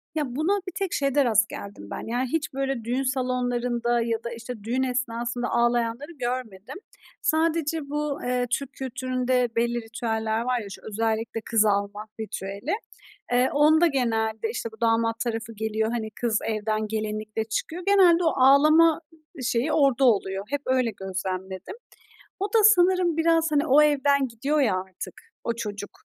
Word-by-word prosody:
Ya, 275 -5 -2
buna 355 +8 +1
bir - - -3
tek 390 -3 -2
şeyde 275 -1 +2
rast 225 -1 +3
geldim 200 - -9
ben. - - -6
Yani, 245 +3 -1
hiç, 320 -3 -1
böyle, 270 -3 -2
düğün 250 +4 -1
salonlarında 245 -2 0
ya 230 -1 -2
da, 235 - -4
işte, 230 -2 -8
düğün 250 +4 0
esnasında 245 -1 -2
ağlayanları 240 +5 0
görmedim. 250 - -5 0.5
Sadece 315 -2 0
bu, 295 -1 -2
eee, 250 0 0
Türk 275 +2 -2
kültüründe 255 -1 -1
belli 235 0 0
ritüeller 225 -1 -2
var 250 0 0
ya, 205 - -7
şu - - -10
özellikle 225 +1 -1
kız 220 -1 +2
almak 205 +1 -1
ritüeli, 205 - -4 0.6
eee, 250 +1 +3
onda 315 +4 +5
genelde, 225 - 0
işte, 230 - -4
bu 220 - -17
damat 230 0 +2
tarafı 230 -1 -3
geliyor, 220 +1 -1
hani, 220 -2 -3
kız 225 -3 +1
evden 215 0 -1
gelinlikle 215 0 -3
çıkıyor. 320 +10 -4
Genelde 360 -4 +5
o 320 - +2
ağlama 305 +5 +5 0.4
şeyi 245 +6 0
orada 275 -3 +3
oluyor; 195 -3 +1
hep 285 0 -2
öyle 255 -3 +1
gözlemledim. 190 - -5 0.7
O 400 - +1
da 445 +2 +2
sanırım 360 -4 +5
biraz, 325 0 +3
hani, 295 +2 +2
o 290 +3 +6
evden 280 -2 +3
gidiyor 275 +7 -1
ya 215 -8 +2
artık 185 -1 -8 0.3
o 235 - 0
çocuk, 205 -3 -5
245 Hz, 155 wpm, -25 LUFS, 220-285 Hz, 0.7 s, o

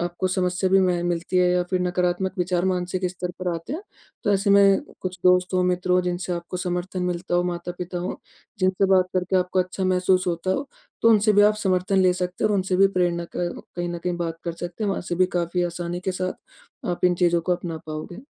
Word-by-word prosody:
आपको 175 +2 -2
समस्या 185 0 0
भी 195 - +6
मैं 180 -2 +1
मिलती 175 +1 -1
है 180 0 +4
या 180 0 +2
फिर 185 -1 +1
नकारात्मक 180 +1 0
विचार 180 0 0
मानसिक 185 0 -1
स्तर 180 0 -4
पर 180 - -1
आते 165 - -6
हैं, 345 +6 -4 0.4
तो 205 - +2
ऐसे 200 +1 +2
में, 200 +5 +6 0.2
कुछ 185 -1 -5
दोस्तों 180 0 +4
मित्रों 180 0 +2
जिनसे 180 0 -2
आपको 170 +1 -4
समर्थन 180 0 -3
मिलता 175 0 -2
हो, 175 - +3
माता-पिता 175 0 -4
हों, 180 - -3 0.4
जिनसे 185 +1 +2
बात 185 -1 +4
करके 185 +1 +1
आपको 185 +1 0
अच्छा 185 +1 -3
महसूस 185 0 +2
होता 175 +1 -1
हो, 275 +8 -1 0.3
तो 230 - +6
उनसे 215 0 +4
भी 205 0 +6
आप 210 +1 +5
समर्थन 185 0 +1
ले 185 -1 +4
सकते 180 +2 -3
हैं - - +4
और 210 - +2
उनसे 185 -1 0
भी 195 +1 +6
प्रेरणा 175 -2 0
क 175 -1 -3
कहीं 175 0 -2
न 175 0 -4
कहीं 175 0 -2
बात 165 -1 -3
कर 170 - -2
सकते 175 +5 -5
हैं। 200 - +1
वहाँ - - -2
से 175 - -1
भी 185 +1 +3
काफ़ी 175 +1 0
आसानी 175 0 -4
के 185 +1 -2
साथ, 185 0 -2 0.5
आप 175 0 -2
इन 180 - +4
चीज़ों 175 -1 +2
को 180 +2 0
अपना 175 -2 -5
पाओगे। 155 +3 -6
180 Hz, 225 wpm, -24 LUFS, 175-185 Hz, 0.5 s, भी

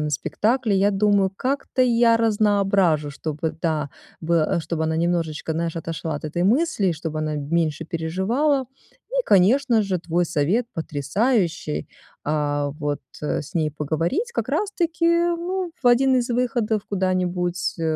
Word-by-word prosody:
на 150 - -1
спектакли. 220 - 0
Я 195 +1 +3
думаю, 200 -1 +2
как-то 265 0 -1
я 235 -1 +4
разноображу, 200 -8 +2
чтобы, 155 +2 -3
да, 155 -4 -1 0.3
было 165 -1 +1
э, - - 0
чтобы 160 -1 -2
она 160 0 0
немножечко, 165 -2 -1
знаешь, 165 +1 -2
отошла 165 -1 -4
от 145 - -6
этой 175 +4 -1
мысли, 225 - +2
чтобы 155 0 -5
она 155 0 -2
меньше 155 +1 -1
переживала. 190 - 0 0.5
И, - - +1
конечно 225 +4 +4
же, 190 -3 -1
твой 170 +1 0
совет 175 +9 0
потрясающий. 160 - -1 0.4
А, 145 -1 0
вот, 145 -1 -3 0.2
э, 150 - -1
с 145 - -12
ней 155 -2 +1
поговорить 165 - -2
как - - -2
раз 415 -1 0
таки, 335 -2 0
ну, 345 +2 +1
в - - 0
1 260 +2 +5
из 245 0 0
выходов 235 -3 0
куда-нибудь, 180 -2 -1
э, 165 - -4
180 Hz, 150 wpm, -23 LUFS, 160-240 Hz, 0.5 s, 1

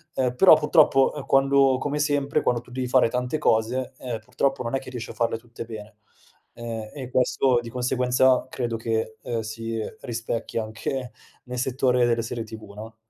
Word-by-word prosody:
ehm, 125 -1 0
però 170 +4 +8
purtroppo, 150 -3 +4
ehm, 145 -2 -7
quando 135 -1 +4
come 145 +2 -2
sempre, 145 -1 +1
quando 120 -1 +1
tu 125 - -17
devi 125 0 -3
fare 125 -1 +4
tante 125 +4 -1
cose, 120 +3 +1
ehm, 120 -3 -5
purtroppo 135 +5 -1
non 115 +2 -2
è - - +1
che - - -10
riesci 120 -2 -6
a - - -10
farle 115 -1 0
tutte 115 0 -9
bene. 110 -1 -9 0.6
Ehm, 115 -2 -6
e 130 -3 -6
questo 125 0 +2
di 115 - -8
conseguenza 125 +1 +2
credo 120 -2 -3
che, 110 -1 -2
ehm, 115 -2 -3
si, 115 +1 -5
uhm, 110 - -5
rispecchia 115 -2 -3
anche 115 +4 -4 0.3
nel 125 0 -5
settore 125 -1 +2
delle 115 -1 +1
serie 115 0 -4
TV, 110 -2 -10
no? 110 +2 -9
125 Hz, 190 wpm, -25 LUFS, 115-130 Hz, 0.6 s, però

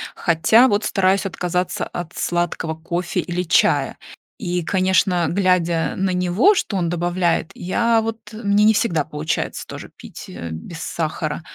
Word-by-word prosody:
хотя 175 +9 +4
вот 205 0 +1
стараюсь 195 0 +2
отказаться 180 -1 -2
от 175 -2 -7
сладкого 175 -2 -1
кофе 170 +2 -3
или 180 0 -2
чая. 165 - +2 0.4
И, 180 -3 -2
конечно, 185 -1 +2
глядя 175 -3 +1
на 190 0 0
него, 180 - +3
что 205 - -1
он 170 -2 0
добавляет, 175 -1 0
я 230 +5 +1
вот 225 0 -4
мне 210 -1 +1
не 220 +1 +6
всегда 205 -9 +1
получается 155 +1 -3
тоже - - -8
пить, - - -11
э, 85 - -7
без 80 - -8
сахара, 155 -1 -3
180 Hz, 145 wpm, -21 LUFS, 165-195 Hz, 0.4 s, не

